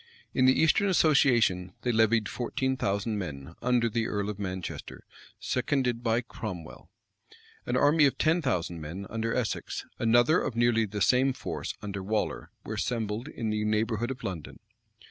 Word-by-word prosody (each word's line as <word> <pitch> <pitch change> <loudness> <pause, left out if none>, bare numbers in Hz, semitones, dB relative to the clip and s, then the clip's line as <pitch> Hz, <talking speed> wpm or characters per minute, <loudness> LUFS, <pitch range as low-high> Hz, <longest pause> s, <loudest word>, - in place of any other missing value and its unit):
In 130 - +3
the 130 - +5
eastern 160 +5 +4
association 120 - +3
they 125 - +1
levied 110 -1 +3
fourteen 130 +2 -2
thousand 105 -2 -1
men, 70 -7 -6
under 125 -1 +2
the 115 0 -1
earl 105 0 -2
of 105 - -10
Manchester, 95 -2 -6 0.3
seconded 125 -2 0
by 115 0 +1
Cromwell.[*] 95 -9 -8 0.8
An 125 - +1
army 145 +1 +5
of 135 - -2
ten 165 +3 +2
thousand 90 - -1
men, 85 +6 -6
under 115 0 -1
Essex; 125 -4 -2
another 120 +8 +4
of 125 - -3
nearly 115 -1 +3
the 105 +1 -5
same 130 +1 +4
force, - - -5
under 100 -1 -4
Waller, 105 +2 -2 0.2
were - - -4
assembled 115 +1 -2
in 115 -7 -3
the 105 0 -1
neighborhood 110 +2 0
of 130 -1 -6
London. 85 -6 -5
115 Hz, 160 wpm, -28 LUFS, 100-125 Hz, 0.8 s, the